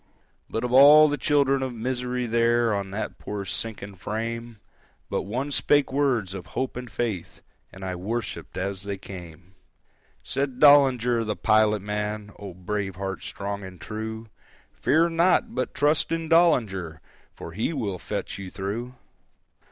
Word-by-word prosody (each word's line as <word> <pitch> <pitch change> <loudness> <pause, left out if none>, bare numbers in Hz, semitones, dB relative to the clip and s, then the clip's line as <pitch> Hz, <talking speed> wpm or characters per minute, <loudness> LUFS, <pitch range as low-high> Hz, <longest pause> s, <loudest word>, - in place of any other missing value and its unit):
But 115 - -2
of 125 0 -2
all 145 +3 +9
the 145 - 0
children 140 0 +2
of 130 -2 -3
misery 125 +1 -2
there 115 0 +2
On 100 -1 -2
that 100 +3 -5
poor 100 -1 -5
sinking 100 +1 -4
frame, 115 +4 -4 0.5
But - - 0
one 130 +6 -2
spake 145 -1 +2
words 125 -9 +1
of 95 -3 -7
hope 130 - -1
and 125 0 -6
faith, 110 -9 -4 0.3
And 95 - -11
I 95 - -3
worshipped 110 +5 -4
as 95 0 -3
they 100 0 -4
came: 90 -2 -11 0.7
Said 135 -2 -2
Dollinger 130 -5 +5
the 105 -1 -2
pilot 110 -2 +3
man,—(O 105 -2 -5
brave 95 +1 -3
heart, 95 -1 -4
strong 100 0 -5
and 95 -2 -10
true!)—"Fear 110 - -2
not, 170 +2 +2
but 130 +1 -3
trust 145 +3 +2
in 165 0 -1
Dollinger, 110 - +2 0.4
For 85 - -8
he 110 - -1
will 105 - -3
fetch - - -5
you 95 -2 -6
through." 105 +7 -5
110 Hz, 145 wpm, -25 LUFS, 100-130 Hz, 0.7 s, all